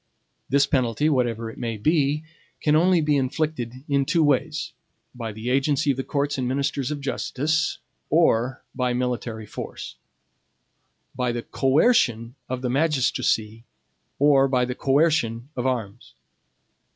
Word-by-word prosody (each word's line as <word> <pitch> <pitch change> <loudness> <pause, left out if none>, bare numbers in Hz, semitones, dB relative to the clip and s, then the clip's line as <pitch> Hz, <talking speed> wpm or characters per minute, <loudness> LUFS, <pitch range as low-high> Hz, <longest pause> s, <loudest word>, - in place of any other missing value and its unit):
This 140 +1 +4
penalty, 130 +2 +1
whatever 115 -5 0
it - - -13
may 115 -2 -3
be, 150 +4 +1 0.4
can 150 0 +2
only 175 +2 +4
be 150 -1 +2
inflicted 130 -2 -2
in 140 -2 +2
two 165 +4 +2
ways: 145 +2 0 0.4
by 115 -3 -5
the 110 +4 -4
agency 140 +1 +2
of 130 - -3
the 135 - -2
courts 140 0 -1
and 125 - -1
ministers 135 0 -1
of 150 -2 -4
justice, 150 +3 -1 0.3
or 130 -6 +2
by 125 -1 0
military 120 -3 -3
force; 65 - -8 1.2
by 125 -1 -1
the 120 0 -4
COERCION 130 - +2 0.2
of 130 0 -4
the 125 - 0
magistracy, 125 -6 0 0.5
or 140 -1 +5
by 125 -2 +1
the 125 - -3
COERCION 135 -4 +1
of 125 0 -1
arms. 120 -4 -4
130 Hz, 140 wpm, -24 LUFS, 120-145 Hz, 1.2 s, or